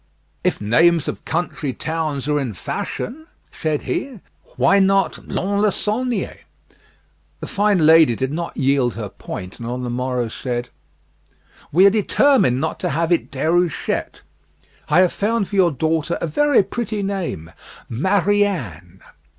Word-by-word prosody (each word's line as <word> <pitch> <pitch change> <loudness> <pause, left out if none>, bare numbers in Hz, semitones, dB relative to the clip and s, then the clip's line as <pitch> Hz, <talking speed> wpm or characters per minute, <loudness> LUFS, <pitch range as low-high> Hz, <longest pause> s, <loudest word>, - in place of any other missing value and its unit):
"If - - 0
names 160 +10 +3
of - - -5
country 160 -4 -2
towns 155 -3 -3
are 150 0 +1
in 125 -7 -3
fashion," 310 - -5 0.2
said 155 -2 -2
he, 265 -6 -3 0.4
"why 200 - +4
not 195 0 +1
Lons 200 +2 -1
le 210 -1 +3
Saulnier?" 240 +5 -2 1.0
The - - -6
fine 200 -5 +2
lady 160 -6 +6
did 130 +4 -2
not 170 +2 -4
yield 135 -3 +1
her 105 -2 -5
point, 90 -1 -8
and 115 - -6
on 125 +1 -4
the 120 - -3
morrow 125 -1 -1
said, 120 +1 -4 1.0
"We 180 +6 +5
are 200 - +7
determined 215 - +3
not 160 +3 -2
to - - -1
have 165 +5 -1
it 170 - +1
Déruchette; 165 +5 -1 0.7
I 170 +5 +5
have 185 - +2
found 215 0 0
for 205 - -6
your 185 -3 +5
daughter 160 +4 -1
a 250 - +3
pretty 215 -2 -3
name 180 - -4 0.4
Marianne." 165 - 0
165 Hz, 140 wpm, -20 LUFS, 130-200 Hz, 1.0 s, are